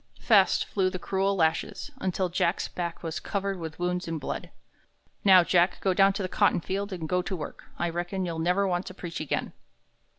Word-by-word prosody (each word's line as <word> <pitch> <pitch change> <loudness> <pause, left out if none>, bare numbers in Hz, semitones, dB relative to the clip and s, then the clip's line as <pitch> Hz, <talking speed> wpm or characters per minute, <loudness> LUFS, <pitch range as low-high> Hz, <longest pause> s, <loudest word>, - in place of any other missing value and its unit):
Fast 200 -5 +4
flew 190 -2 +1
the 185 - -4
cruel 195 +2 0
lashes, 160 -3 0
until 185 0 0
Jack's 175 0 0
back 170 -1 -5
was 165 -1 -3
covered 195 -2 -3
with 160 -1 -6
wounds 180 0 -1
and 165 -1 -3
blood. 135 - -5 0.7
"Now, 185 -3 +8
Jack, 175 +1 +3
go 190 - +1
down 195 +1 +5
to 195 - -3
the - - -1
cotton - - +2
field 195 +4 -3
and 170 -4 -4
go 180 +1 +1
to 185 - -4
work. 150 -4 -7
I 175 - 0
reckon 175 +3 -2
you'll 165 -2 -3
never 180 +4 +2
want 175 0 -1
to 185 - -8
preach 175 -2 -6
again." 155 - -2
180 Hz, 200 wpm, -27 LUFS, 170-195 Hz, 0.7 s, Now